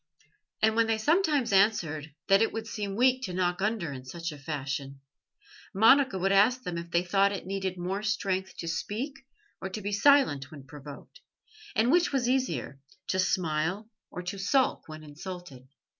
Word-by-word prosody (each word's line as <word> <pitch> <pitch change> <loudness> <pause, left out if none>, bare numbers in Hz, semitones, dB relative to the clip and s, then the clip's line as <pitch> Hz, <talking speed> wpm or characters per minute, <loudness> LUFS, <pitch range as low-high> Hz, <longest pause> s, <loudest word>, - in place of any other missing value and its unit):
And 220 0 +4
when 230 0 +3
they 225 0 +1
sometimes 295 - +2
answered 165 -7 +2 0.2
that 195 +1 +5
it 225 - +2
would 225 0 -5
seem 210 -3 -4
weak 255 +3 +3
to 180 -3 -5
knock 180 0 0
under 205 -7 -1
in 130 -2 -7
such 165 +5 -5
a 150 - -10
fashion, 140 -1 -4 0.8
Monica 255 +3 +5
would 195 +1 +1
ask 225 +6 +4
them 175 -1 -3
if 170 0 -8
they 170 +1 +1
thought 195 +2 +3
it 200 - -5
needed 190 -1 -3
more 185 +3 -3
strength 195 -3 -2
to 165 - -5
speak 210 - -3 0.5
or 190 - -4
to 195 - -5
be 205 0 -4
silent 200 - +4
when 150 -4 -11
provoked, 145 - -12 0.6
and 235 +3 +3
which 350 +2 +3
was 265 -4 0
easier, 255 - -1 0.3
to 185 - 0
smile 185 +4 0 0.2
or 180 - -7
to 190 +2 -5
sulk 255 +7 +1
when 155 0 -9
insulted? 150 -3 -9
190 Hz, 175 wpm, -28 LUFS, 165-225 Hz, 0.8 s, that